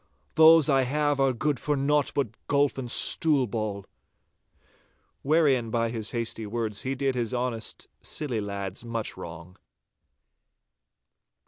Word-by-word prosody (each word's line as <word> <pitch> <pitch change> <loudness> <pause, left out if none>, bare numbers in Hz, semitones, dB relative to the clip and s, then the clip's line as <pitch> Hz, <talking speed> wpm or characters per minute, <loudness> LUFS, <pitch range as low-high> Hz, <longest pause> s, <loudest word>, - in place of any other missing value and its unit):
Those 160 -1 +7
I 135 -2 +3
have 145 +2 0
are 135 -1 +3
good 140 +2 -2
for 150 - -1
naught 145 +1 +1
but 140 -5 0 0.2
golf 140 -1 +1
and 125 -2 -5
stool 145 +1 +4
ball.' 105 -3 -4 1.4
Wherein 140 -6 +2
by 115 0 0
his 110 -2 -3
hasty 115 -2 -3
words 110 -2 -3
he 135 +1 -3
did 135 0 -1
his 125 0 -3
honest, 120 -2 -4
silly 125 -8 -4
lads 100 0 -5
much 115 -2 -4
wrong. 85 0 -10
125 Hz, 130 wpm, -26 LUFS, 110-140 Hz, 1.4 s, Those